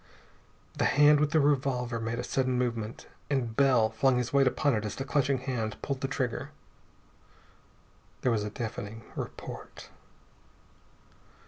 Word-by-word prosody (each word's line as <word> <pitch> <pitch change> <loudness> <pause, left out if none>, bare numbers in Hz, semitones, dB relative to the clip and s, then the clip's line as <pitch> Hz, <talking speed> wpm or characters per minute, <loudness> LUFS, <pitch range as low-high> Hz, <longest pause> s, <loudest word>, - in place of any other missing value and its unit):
The - - +3
hand 150 0 +6
with 150 0 +2
the 160 +1 +3
revolver 130 -4 +1
made 115 +1 -3
a 120 - -3
sudden 130 0 0
movement, 115 -3 -2 0.2
and 125 -6 -1
Bell 125 -5 +4
flung 125 +3 +2
his 125 +1 -2
weight 140 -1 +5
upon 145 +2 +2
it 105 -2 0
as 105 - -4
the 135 - -4
clutching 140 -1 +1
hand 125 -4 -3
pulled 140 -1 -3
the 135 - 0
trigger. 130 -3 -2 1.7
There 125 - +2
was 110 -2 +1
a 105 - -3
deafening 110 0 -6
report.... - - -8
125 Hz, 145 wpm, -29 LUFS, 115-140 Hz, 1.7 s, hand